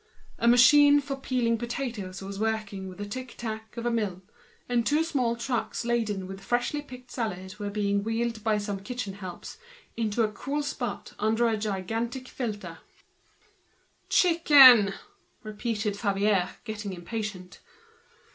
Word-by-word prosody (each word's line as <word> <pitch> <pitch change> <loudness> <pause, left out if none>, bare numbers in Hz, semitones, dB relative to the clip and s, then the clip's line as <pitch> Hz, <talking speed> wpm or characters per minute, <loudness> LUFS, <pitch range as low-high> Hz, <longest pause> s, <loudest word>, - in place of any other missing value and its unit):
A 235 - +1
machine 285 +4 +7
for 280 -1 -4
peeling 245 -4 0
potatoes 235 -6 -4
was 195 0 -6
working 215 -3 -2
with 185 - -11
the 205 - -5
tic 255 +4 -7
tac 220 0 -6
of 235 - -4
a 240 - +1
mill. 200 -5 -2 0.6
Two 300 +6 +2
small 255 -8 0
trucks 235 0 -3
laden 220 -5 -1
with 190 +1 -8
freshly 245 +7 -1
picked 250 -3 -12
salad 190 -4 -4
were 205 -1 -3
being 200 -1 0
wheeled 230 +1 -1
along 215 - -15
by 220 -2 +2
some 205 -1 -3
kitchen 225 0 -5
helps 190 - -9 0.4
into 220 -1 -2
the 215 - +1
fresh 285 +6 -3
air 240 -5 -1 0.2
under 225 +2 +2
a 220 -2 -1
fountain. 225 +3 -4 1.3
"Chicken," 275 - +7 0.5
repeated 215 -1 -2
Favier, 200 -2 +1
getting 210 -3 -5
impatient. 185 0 -6
220 Hz, 135 wpm, -27 LUFS, 200-245 Hz, 1.3 s, machine